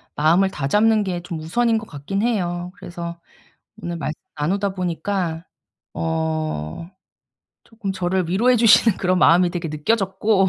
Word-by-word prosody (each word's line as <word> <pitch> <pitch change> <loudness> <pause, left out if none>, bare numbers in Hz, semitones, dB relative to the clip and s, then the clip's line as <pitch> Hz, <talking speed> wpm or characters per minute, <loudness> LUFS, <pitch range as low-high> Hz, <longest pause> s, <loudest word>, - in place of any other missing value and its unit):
마음을 170 +6 +3
다잡는 210 +10 +2
게 180 -3 -3
좀 170 -2 -5
우선인 225 +8 +1
거 220 - -5
같기는 195 +7 -3
해요. 180 -6 -1
그래서 170 -2 -7 0.6
오늘 170 0 -4
말씀 155 0 -4 0.2
나누다 195 +6 0
보니까 175 -2 -2 0.5
어 160 - -3 0.7
조금 220 -4 -5
저를 185 -1 -1
위로해 240 +7 +3
주시는 225 -2 +5
그런 185 -1 +1
마음이 175 +1 +5
되게 170 -2 -4
느껴졌고 195 +4 +1
180 Hz, 300 characters per minute, -21 LUFS, 165-200 Hz, 0.7 s, 주시는